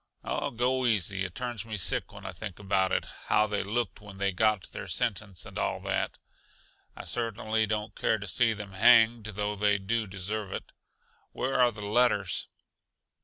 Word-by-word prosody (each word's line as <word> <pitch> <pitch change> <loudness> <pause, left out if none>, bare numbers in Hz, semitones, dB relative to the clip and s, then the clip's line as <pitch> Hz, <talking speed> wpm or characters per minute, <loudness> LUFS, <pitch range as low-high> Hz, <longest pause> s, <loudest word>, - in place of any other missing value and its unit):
"Oh, - - -1
go 125 +2 +1
easy. 100 -3 +1
It 90 - -7
turns 120 -5 -3
me 110 -1 -5
sick 90 - 0
when - - -11
I - - -4
think 95 +1 -7
about 95 -2 +1
it; - - +1 0.2
how 105 - +4
they 105 -1 -1
looked 115 +3 -2
when 100 -2 -11
they 100 0 +1
got 105 +1 +2
their - - -6
sentence, 100 -4 -1
and - - -7
all - - 0
that. - - -1 0.8
I - - -8
certainly 110 -1 0
don't 105 +1 -2
care 110 - +1
to 100 - -7
see 115 +4 +3
them 105 -2 -7
hanged, 115 +2 +6
though 105 0 -2
they 105 0 +3
do 110 +3 -1
deserve 95 +2 -4
it. - - -6 0.6
Where 130 0 0
are 120 -1 +5
the 105 -2 -7
letters?" 105 -3 +2
105 Hz, 180 wpm, -29 LUFS, 100-115 Hz, 0.8 s, hanged